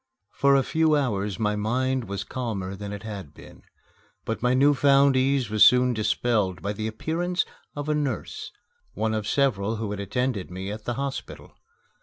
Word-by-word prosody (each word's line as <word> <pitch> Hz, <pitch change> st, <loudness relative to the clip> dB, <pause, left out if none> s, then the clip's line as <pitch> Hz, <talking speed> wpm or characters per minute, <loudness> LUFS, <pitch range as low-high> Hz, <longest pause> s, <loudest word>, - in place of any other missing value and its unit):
For 140 Hz, 0 st, +3 dB
a 135 Hz, -, +4 dB
few 160 Hz, +1 st, +2 dB
hours 105 Hz, -8 st, -1 dB
my 105 Hz, -2 st, 0 dB
mind 125 Hz, +4 st, 0 dB
was 100 Hz, -1 st, -4 dB
calmer 105 Hz, -7 st, -4 dB
than 100 Hz, +1 st, -7 dB
it 100 Hz, -1 st, -7 dB
had 100 Hz, -9 st, -7 dB
been. -, -, -14 dB, 0.6 s
But 115 Hz, -, -3 dB
my 125 Hz, +1 st, +2 dB
new 140 Hz, +3 st, +5 dB
found 140 Hz, -1 st, +4 dB
ease 130 Hz, -3 st, +1 dB
was 110 Hz, -1 st, +6 dB
soon 125 Hz, 0 st, +6 dB
dispelled 105 Hz, -3 st, 0 dB
by 100 Hz, +3 st, -3 dB
the 110 Hz, +1 st, -3 dB
appearance 170 Hz, +11 st, -1 dB, 0.3 s
of 145 Hz, 0 st, -4 dB
a 155 Hz, -, +2 dB
nurse 145 Hz, -3 st, -3 dB, 0.4 s
one 110 Hz, 0 st, 0 dB
of 110 Hz, -1 st, -2 dB
several 115 Hz, -5 st, +1 dB
who 110 Hz, -2 st, -4 dB
had 105 Hz, -, -4 dB
attended 110 Hz, +1 st, -2 dB
me 95 Hz, +2 st, -5 dB
at 105 Hz, 0 st, -7 dB
the 120 Hz, -, -2 dB
hospital. 140 Hz, +1 st, -5 dB
115 Hz, 180 wpm, -25 LUFS, 105-135 Hz, 0.6 s, was